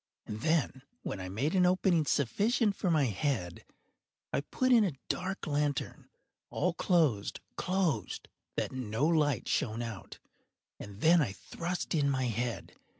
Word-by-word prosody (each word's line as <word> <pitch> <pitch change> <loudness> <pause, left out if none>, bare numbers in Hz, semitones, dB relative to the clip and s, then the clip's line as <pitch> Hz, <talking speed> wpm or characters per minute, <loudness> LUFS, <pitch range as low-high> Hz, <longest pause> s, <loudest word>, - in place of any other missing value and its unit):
And 105 0 -6
then, 155 -4 +1 0.2
when 100 - -4
I 90 - -5
had 90 - -6
made 140 +10 0
an 180 -2 +4
opening 180 -4 +2
sufficient 205 - +2
for 185 - -1
my 155 -4 +3
head, 100 - -2 0.7
I - - +1
put 255 - 0
in 235 -3 +7
a 170 -9 -1
dark 190 +2 -2
lantern, 145 -3 -2 0.4
all 180 -1 0
closed, 155 - +1 0.2
closed, 185 -4 -1 0.3
that - - -1
no 125 0 -1
light 150 -4 +2
shone 120 -4 0
out, 115 -5 -7 0.6
and 100 +1 -9
then 170 +1 +6
I 110 -10 -1
thrust 175 - -4
in 145 -3 +2
my 130 -1 0
head. 120 0 -3
145 Hz, 150 wpm, -31 LUFS, 120-175 Hz, 0.7 s, in